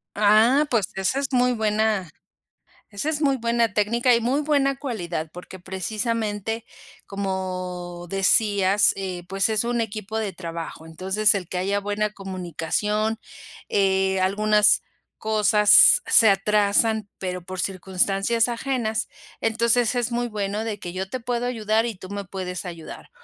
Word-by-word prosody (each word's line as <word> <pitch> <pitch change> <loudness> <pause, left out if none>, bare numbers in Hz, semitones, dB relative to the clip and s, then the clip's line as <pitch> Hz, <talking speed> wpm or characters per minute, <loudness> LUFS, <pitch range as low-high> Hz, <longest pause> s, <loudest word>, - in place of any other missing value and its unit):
Ah, 220 +8 +4
pues, 220 -6 +1
esa 190 +8 0
es 275 -2 -3
muy 250 0 +3
buena 215 -4 0 0.8
esa 205 +10 -3
es 305 -1 -1
muy 275 -2 +2
buena 235 -2 0
técnica 235 +4 +2
y 235 - +3
muy 265 +6 +1
buena 280 -2 +1
cualidad, 175 - -4
porque 180 +1 -10
precisamente, 215 +3 -3 0.4
como 185 -3 -4
decías, 195 +1 +3
eh, 185 -3 -5
pues, 195 +3 +1
es 215 0 +1
un 240 0 -1
equipo 220 0 -4
de 210 -3 -2
trabajo, 165 -2 -7
entonces 190 +6 +1
el 185 -4 -4
que 180 - -4
haya 200 +2 0
buena 205 +1 -2
comunicación, 195 +3 -2 0.5
eh, 190 -1 +1
algunas 210 +2 +3 0.3
cosas 210 - +5
se 220 -2 +6
atrasan, 210 +1 +2
pero 180 -1 -4
por 185 0 -7
circunstancias 195 +4 0
ajenas, 235 -2 -2 0.3
entonces 230 +2 +1
es 245 0 -1
muy 240 +1 -1
bueno 210 -1 -3
de 220 -2 -4
que 175 0 -7
yo 190 +1 -4
te 255 - -4
puedo 245 0 -2
ayudar 225 -1 0
y 225 - -4
tú 185 +1 -11
me 200 0 -5
puedes 185 -1 -5
ayudar. 170 -2 -9
210 Hz, 145 wpm, -23 LUFS, 190-230 Hz, 0.8 s, se